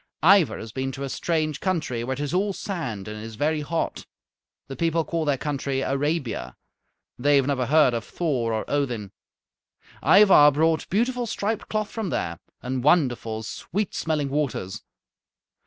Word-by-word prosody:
Ivar 180 Hz, -, +5 dB
has 110 Hz, -, -8 dB
been 130 Hz, +2 st, -3 dB
to 135 Hz, -, -6 dB
a 135 Hz, -, -3 dB
strange 155 Hz, 0 st, -1 dB
country 155 Hz, -11 st, -1 dB
where 130 Hz, +2 st, -2 dB
it -, -, -9 dB
is 145 Hz, +2 st, -3 dB
all 195 Hz, +2 st, +1 dB
sand 130 Hz, -, -5 dB
and 105 Hz, 0 st, -6 dB
is 110 Hz, -1 st, -8 dB
very 150 Hz, +5 st, 0 dB
hot. 165 Hz, +3 st, -3 dB, 0.6 s
The 135 Hz, -, -6 dB
people 165 Hz, 0 st, 0 dB
call 165 Hz, 0 st, -2 dB
their 145 Hz, -2 st, +1 dB
country 140 Hz, -1 st, -2 dB
Arabia. 135 Hz, -, -2 dB, 0.6 s
They 145 Hz, +3 st, +4 dB
have 135 Hz, -2 st, +4 dB
never 130 Hz, -3 st, 0 dB
heard 150 Hz, -3 st, +5 dB
of 115 Hz, -1 st, -2 dB
Thor 130 Hz, -9 st, -1 dB
or 110 Hz, -1 st, -1 dB
Odin. 120 Hz, -9 st, -2 dB, 0.9 s
Ivar 185 Hz, -8 st, +7 dB
brought 160 Hz, +2 st, +1 dB
beautiful 240 Hz, +4 st, 0 dB
striped 210 Hz, +1 st, -2 dB
cloth 215 Hz, -1 st, -2 dB
from 220 Hz, -5 st, -3 dB
there, 85 Hz, -, -2 dB, 0.2 s
and 125 Hz, 0 st, -2 dB
wonderful, 125 Hz, -8 st, +2 dB
sweet 195 Hz, -, -3 dB
smelling 150 Hz, -3 st, -1 dB
waters. 135 Hz, -10 st, -2 dB
145 Hz, 160 wpm, -25 LUFS, 125-165 Hz, 0.9 s, Ivar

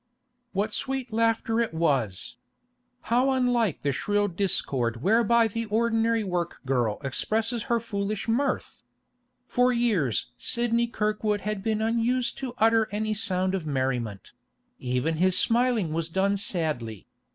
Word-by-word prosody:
What 205 Hz, +2 st, -1 dB
sweet 265 Hz, -3 st, -3 dB
laughter 225 Hz, 0 st, +1 dB
it 230 Hz, -8 st, -1 dB
was? 115 Hz, -, 0 dB, 0.8 s
How 255 Hz, +3 st, +4 dB
unlike 245 Hz, -, +1 dB
the 140 Hz, -, +1 dB
shrill 205 Hz, +9 st, 0 dB
discord 135 Hz, -, 0 dB
whereby 230 Hz, +3 st, +4 dB
the 230 Hz, +2 st, -3 dB
ordinary 225 Hz, +1 st, +1 dB
work 175 Hz, -3 st, -3 dB
girl 120 Hz, -5 st, 0 dB
expresses 220 Hz, -, -1 dB
her 235 Hz, -1 st, +3 dB
foolish 205 Hz, -1 st, -3 dB
mirth! 255 Hz, +5 st, -1 dB, 0.6 s
For 250 Hz, 0 st, +2 dB
years 210 Hz, -, +1 dB
Sidney 235 Hz, 0 st, +1 dB
Kirkwood 210 Hz, -2 st, -1 dB
had 210 Hz, -1 st, -3 dB
been 220 Hz, +1 st, -1 dB
unused 235 Hz, +2 st, +1 dB
to 255 Hz, -3 st, -5 dB
utter 225 Hz, -1 st, +4 dB
any 215 Hz, +1 st, -1 dB
sound 190 Hz, -3 st, 0 dB
of 180 Hz, -5 st, -3 dB
merriment; 125 Hz, -7 st, -2 dB, 0.5 s
even 125 Hz, +5 st, -1 dB
his 185 Hz, +2 st, +3 dB
smiling 230 Hz, -8 st, +2 dB
was 165 Hz, 0 st, -2 dB
done 195 Hz, +3 st, +1 dB
sadly. 155 Hz, -, -2 dB
210 Hz, 130 wpm, -26 LUFS, 160-230 Hz, 0.8 s, How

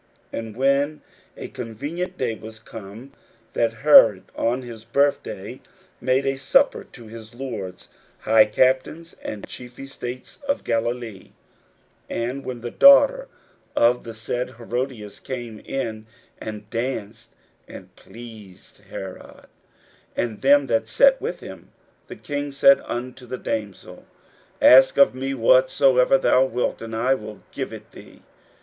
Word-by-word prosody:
41:006:021 -, -, -2 dB
And 110 Hz, -, -11 dB
when 140 Hz, +3 st, +1 dB, 0.4 s
a -, -, -6 dB
convenient 145 Hz, +11 st, -6 dB
day 120 Hz, -3 st, -1 dB
was 110 Hz, 0 st, -10 dB
come, 110 Hz, +4 st, -11 dB, 0.4 s
that 115 Hz, -1 st, +1 dB
Herod 110 Hz, -10 st, +7 dB
on 125 Hz, +3 st, -1 dB
his 115 Hz, -3 st, -10 dB
birthday 140 Hz, +5 st, -1 dB, 0.4 s
made 130 Hz, +2 st, +1 dB
a 135 Hz, 0 st, -1 dB
supper 135 Hz, -, +2 dB
to 120 Hz, -, -14 dB
his 110 Hz, +1 st, -12 dB
lords, 105 Hz, -9 st, -7 dB, 0.3 s
high 110 Hz, 0 st, +5 dB
captains, 130 Hz, +9 st, 0 dB
and 105 Hz, -2 st, -6 dB
chief 125 Hz, 0 st, -10 dB
estates 130 Hz, -2 st, -8 dB
of 280 Hz, -, -1 dB
Galilee; 115 Hz, -3 st, -3 dB, 0.8 s
41:006:022 -, -, -3 dB
And 135 Hz, +2 st, -7 dB
when 125 Hz, -2 st, -6 dB
the 120 Hz, 0 st, -5 dB
daughter -, -, +6 dB, 0.5 s
of 120 Hz, +1 st, +3 dB
the 115 Hz, -1 st, -9 dB
said 120 Hz, +3 st, -4 dB
Herodias 120 Hz, -2 st, -5 dB
came 120 Hz, -4 st, -7 dB
in, 110 Hz, -4 st, -5 dB, 0.3 s
and 105 Hz, -1 st, -7 dB
danced, 115 Hz, -2 st, -4 dB, 0.4 s
and -, -, -12 dB
pleased 110 Hz, -5 st, -13 dB
Herod 95 Hz, -1 st, -9 dB, 0.7 s
and 110 Hz, -3 st, -2 dB
them 140 Hz, +1 st, +5 dB
that 115 Hz, -3 st, 0 dB
sat 270 Hz, -, +4 dB
with 450 Hz, +4 st, -4 dB
him, -, -, -11 dB, 0.4 s
the -, -, -9 dB
king 145 Hz, 0 st, -5 dB
said 140 Hz, 0 st, +5 dB
unto 125 Hz, +1 st, -6 dB
the 130 Hz, -, -5 dB
damsel, 105 Hz, -6 st, -6 dB, 0.5 s
Ask 130 Hz, +1 st, +7 dB
of 140 Hz, -2 st, +6 dB
me 135 Hz, +1 st, -3 dB
whatsoever 130 Hz, +1 st, +4 dB
thou 130 Hz, 0 st, +3 dB
wilt, 125 Hz, -1 st, -2 dB
and 115 Hz, 0 st, -6 dB
I 125 Hz, +4 st, +2 dB
will 110 Hz, -4 st, -7 dB
give -, -, -5 dB
it -, -, -11 dB
thee. -, -, -15 dB
125 Hz, 140 wpm, -23 LUFS, 110-135 Hz, 0.8 s, Herod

